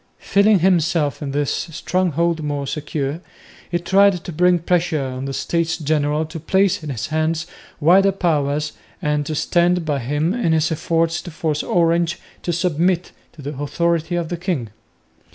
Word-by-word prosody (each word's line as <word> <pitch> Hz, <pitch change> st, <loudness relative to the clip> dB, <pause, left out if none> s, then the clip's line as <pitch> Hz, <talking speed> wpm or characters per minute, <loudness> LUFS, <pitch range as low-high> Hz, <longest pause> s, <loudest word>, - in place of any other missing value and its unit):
Feeling 200 Hz, +1 st, +3 dB
himself 165 Hz, -5 st, +2 dB
in 145 Hz, -, -3 dB
this 145 Hz, 0 st, 0 dB
stronghold 170 Hz, -1 st, -1 dB
more 145 Hz, -2 st, -2 dB
secure, 145 Hz, +1 st, -3 dB, 0.5 s
he 175 Hz, -, 0 dB
tried 190 Hz, +1 st, +3 dB
to -, -, -6 dB
bring 180 Hz, +2 st, +3 dB
pressure 170 Hz, -1 st, 0 dB
on 130 Hz, 0 st, -4 dB
the 135 Hz, -, -3 dB
States 165 Hz, +3 st, -1 dB
General 150 Hz, 0 st, 0 dB
to 160 Hz, +1 st, -7 dB
place 190 Hz, +4 st, +2 dB
in 155 Hz, -, -6 dB
his 125 Hz, -6 st, -3 dB
hands 160 Hz, +1 st, 0 dB, 0.3 s
wider 190 Hz, +6 st, +5 dB
powers 150 Hz, -5 st, 0 dB, 0.3 s
and 150 Hz, -3 st, 0 dB
to 155 Hz, -, -2 dB
stand 175 Hz, +2 st, +2 dB
by 145 Hz, -3 st, 0 dB
him 150 Hz, +8 st, 0 dB
in 225 Hz, -9 st, +1 dB
his 155 Hz, 0 st, +2 dB
efforts 165 Hz, +1 st, 0 dB
to -, -, -8 dB
force 155 Hz, -2 st, -2 dB
Orange 170 Hz, 0 st, +1 dB, 0.2 s
to 175 Hz, -, -2 dB
submit 175 Hz, +1 st, 0 dB, 0.2 s
to 150 Hz, -, -12 dB
the 145 Hz, +2 st, -4 dB
authority 170 Hz, +3 st, 0 dB
of 170 Hz, -2 st, -2 dB
the 175 Hz, -, -3 dB
king. 170 Hz, -, -2 dB
165 Hz, 165 wpm, -20 LUFS, 150-175 Hz, 0.5 s, wider